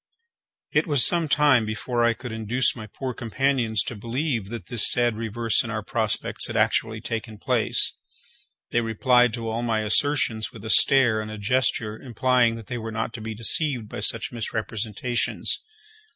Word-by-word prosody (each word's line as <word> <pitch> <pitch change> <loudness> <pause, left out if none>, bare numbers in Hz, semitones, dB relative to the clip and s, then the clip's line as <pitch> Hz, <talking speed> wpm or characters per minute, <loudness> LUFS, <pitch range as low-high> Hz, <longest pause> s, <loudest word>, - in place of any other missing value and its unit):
It - - +1
was 145 -5 +5
some 170 -2 +3
time 145 -5 +4
before 110 +3 -2
I 120 0 +2
could 125 0 -8
induce 110 +3 0
my 110 -3 -8
poor 130 +5 -6
companions 120 -1 0
to 125 - -6
believe 115 0 -3
that 115 -6 -7
this 115 +3 +3
sad 120 -2 +1
reverse 115 0 -1
in 120 - -7
our 110 -2 -4
prospects 110 -3 0
had - - -4
actually 110 -1 0
taken 110 -1 -5
place. - - +1 0.7
They 120 - +1
replied 125 +2 +3
to 115 -2 -6
all 115 +1 -2
my 115 -2 0
assertions 110 -1 +1
with 110 -1 -12
a 110 - -1
stare 120 -5 +6
and 110 - -7
a 110 - -7
gesture 110 -1 0
implying 125 -1 +1
that 115 -2 -9
they 120 +2 -5
were 115 0 -6
not 110 +1 -3
to 115 - -7
be 110 0 -6
deceived 125 - 0
by - - -6
such 115 +2 -1
misrepresentations. 115 0 -3
115 Hz, 175 wpm, -24 LUFS, 110-125 Hz, 0.7 s, stare